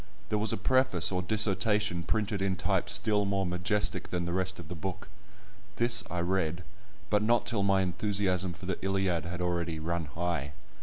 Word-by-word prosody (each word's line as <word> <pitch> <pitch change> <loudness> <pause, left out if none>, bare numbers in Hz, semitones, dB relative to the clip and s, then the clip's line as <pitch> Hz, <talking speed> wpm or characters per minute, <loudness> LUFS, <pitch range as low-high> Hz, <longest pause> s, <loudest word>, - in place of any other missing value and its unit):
There 105 - 0
was 110 0 0
a - - -1
preface 120 -5 +3
or 90 -1 0
dissertation 105 -1 +2
printed 105 +1 -1
in 95 -1 0
type - - 0
still 105 -1 +3
more 100 -1 0
majestic 90 +4 0
than 90 -1 -2
the 85 - -3
rest 95 0 -1
of 85 - -9
the 90 - -6
book; 95 +3 -6 0.7
this 120 0 +4
I 90 - -2
read, 85 -1 -1 0.5
but 105 -1 +3
not 120 +2 +2
till 120 -4 0
my 100 -1 +3
enthusiasm 95 -1 0
for 85 - -11
the 95 -1 -4
Iliad 95 -3 0
had 90 +1 -5
already 85 -2 -1
run 85 +1 -2
high. 75 -1 -3
95 Hz, 185 wpm, -30 LUFS, 85-105 Hz, 0.7 s, this